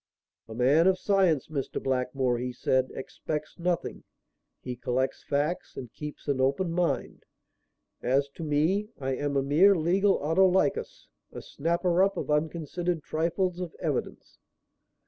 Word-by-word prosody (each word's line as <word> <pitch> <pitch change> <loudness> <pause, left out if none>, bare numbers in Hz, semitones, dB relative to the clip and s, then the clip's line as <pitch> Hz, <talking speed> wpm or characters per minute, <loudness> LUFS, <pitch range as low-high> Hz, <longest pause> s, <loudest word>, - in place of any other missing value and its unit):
"A 110 - -8
man 140 +8 +4
of 190 -1 +4
science, 185 -7 +2
Mr. 140 -4 -3
Blackmore," 125 -1 0
he 125 +1 -3
said, 130 +1 +1
"expects 150 +4 -5
nothing. 175 0 -2 0.6
He 125 -1 -6
collects 130 +2 -2
facts 145 +5 -2
and 125 -3 -7
keeps 150 0 -8
an 140 -2 +1
open 140 +7 +1
mind. 165 -7 -1 0.8
As 135 +3 +2
to 155 +4 -9
me, 160 +8 +1
I 135 -1 -2
am 145 +1 -1
a 135 - +2
mere 170 +9 +5
legal 190 +4 +3
Autolycus, 190 - +1 0.3
a - - -8
snapper 170 +3 0
up 195 +1 +2
of - - -3
unconsidered 160 +2 -1
trifles 175 +3 -1
of 180 -3 -5
evidence. - - -4
155 Hz, 140 wpm, -28 LUFS, 135-180 Hz, 0.8 s, mere